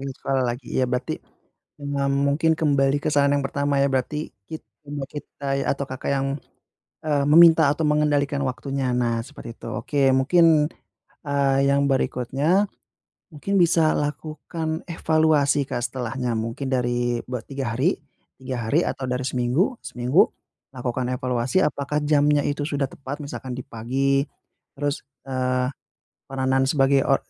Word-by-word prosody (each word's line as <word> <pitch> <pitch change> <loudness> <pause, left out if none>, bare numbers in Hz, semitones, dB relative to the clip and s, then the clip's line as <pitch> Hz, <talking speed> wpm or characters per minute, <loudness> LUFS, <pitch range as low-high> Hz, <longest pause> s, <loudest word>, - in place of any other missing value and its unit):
Sekolah 135 -1 -1
lagi, 125 0 -12
ya 130 - +2
berarti 125 +1 -2 0.6
ma 140 -1 -1
mungkin 140 +4 +2
kembali 140 -3 +2
ke - - 0
saran 140 0 +3
yang 140 - 0
pertama 140 +1 -1
ya 140 - +4
berarti 135 +4 -2 0.2
kit 160 - -7 0.2
imut 145 -2 -5
kita 140 -2 -4
ya, - - -2
atau 140 - -4
Kakak 130 +1 -4
yang, 135 0 0 0.8
eee, 145 -2 +1
meminta 160 -1 +7
atau 155 +2 -2
mengendalikan 145 -1 +1
waktunya. 135 0 -2
Nah, 120 -2 +1
seperti 125 -5 -10
itu. - - -7
Oke, 140 -2 +1
mungkin, 155 +2 +4 0.6
eee, 140 -1 +2
yang 140 0 +2
berikutnya 140 - +1 0.7
mungkin 195 +6 0
bisa 165 -2 +4
lakukan 155 +2 -3
evaluasi 155 -4 +2
Kak. 120 - -3
Setelahnya 125 -1 -3
mungkin 115 +5 -4
dari 120 -1 0
be 125 -1 -3
3 135 -5 -4
hari, 155 +10 +1 0.4
3 130 -3 -4
hari 155 - +4
atau 135 - -4
dari 125 +1 -1
seminggu, 130 - +1
seminggu 125 +8 +3 0.5
lakukan 125 -1 -3
evaluasi. 125 +6 0
Apakah 150 0 -1
jamnya 145 0 +3
itu 145 0 -1
sudah 145 -2 -1
tepat? 140 +2 -7
Misalkan 130 -2 -6
di - - -5
pagi. 135 +4 0 0.5
Terus, 145 0 -2 0.2
eee, 130 -1 0 0.6
peranan 135 0 +1
sebagai 135 -1 +3
o 135 - +5
140 Hz, 145 wpm, -23 LUFS, 130-150 Hz, 0.8 s, meminta